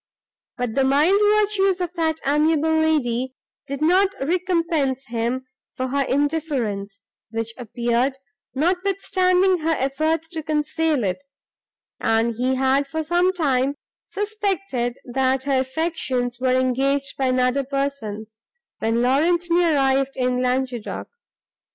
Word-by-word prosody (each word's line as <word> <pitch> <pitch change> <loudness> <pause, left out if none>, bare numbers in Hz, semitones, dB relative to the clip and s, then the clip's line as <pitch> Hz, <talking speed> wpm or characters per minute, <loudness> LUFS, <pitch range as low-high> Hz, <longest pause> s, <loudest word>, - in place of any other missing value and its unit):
But 245 -3 -2
the 270 - +2
mild 295 +9 +4
virtues 415 -2 +3
of 355 -1 -3
that 320 -2 0
amiable 310 +2 +2
lady 260 -5 +1 0.3
did 280 +1 -3
not 370 +4 +4
recompense 330 -4 0
him 240 +2 -2 0.3
for 255 0 -2
her 280 +2 0
indifference, 265 -9 -1 0.3
which 225 0 -3
appeared, 240 +2 -1 0.4
notwithstanding 365 +2 +2
her 325 +1 +1
efforts 310 +5 0
to 325 -2 -4
conceal 305 -2 0
it; 195 +8 -2 0.8
and 225 +1 +1
he 255 +3 0
had, 270 +2 +2
for 315 +3 -3
some 350 +4 +2
time, 280 -6 0 0.3
suspected 390 - -2
that 260 +1 0
her 275 -1 +1
affections 260 -4 -2
were 255 0 +2
engaged 270 +2 0
by 265 - 0
another 255 +2 +2
person, 275 -6 -3 0.5
when 225 +2 +1
Laurentini 340 +6 +2
arrived 270 0 +1
in 250 -1 +1
Languedoc. 255 -2 -2
275 Hz, 120 wpm, -22 LUFS, 255-325 Hz, 0.8 s, mild